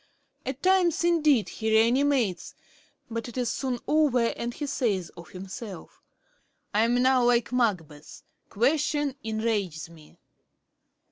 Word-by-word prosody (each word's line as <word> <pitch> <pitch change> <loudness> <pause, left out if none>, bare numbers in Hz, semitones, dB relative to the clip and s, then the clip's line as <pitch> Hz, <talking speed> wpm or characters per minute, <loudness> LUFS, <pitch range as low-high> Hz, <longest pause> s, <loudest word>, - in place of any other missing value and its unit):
At 265 +1 -5
times 365 -3 +3
indeed 305 -9 +3
he 220 -1 -4
re 220 +1 +5
animates; 255 -7 0 0.6
but 230 +1 -4
it 240 - -10
is 245 -2 0
soon 260 -3 -2
over 275 -6 +3
and 235 0 -4
he 290 - -5
says 225 - -1
of 170 -1 -13
himself: 195 +1 -9 0.7
"I 215 +2 +3
am 245 +1 +2
now 260 -1 +4
like 240 -1 +2
Macbeth 180 -12 -2 0.3
question 290 +4 +1
enrages 215 -7 -2
me."' 155 -2 -17
240 Hz, 130 wpm, -26 LUFS, 210-275 Hz, 0.7 s, re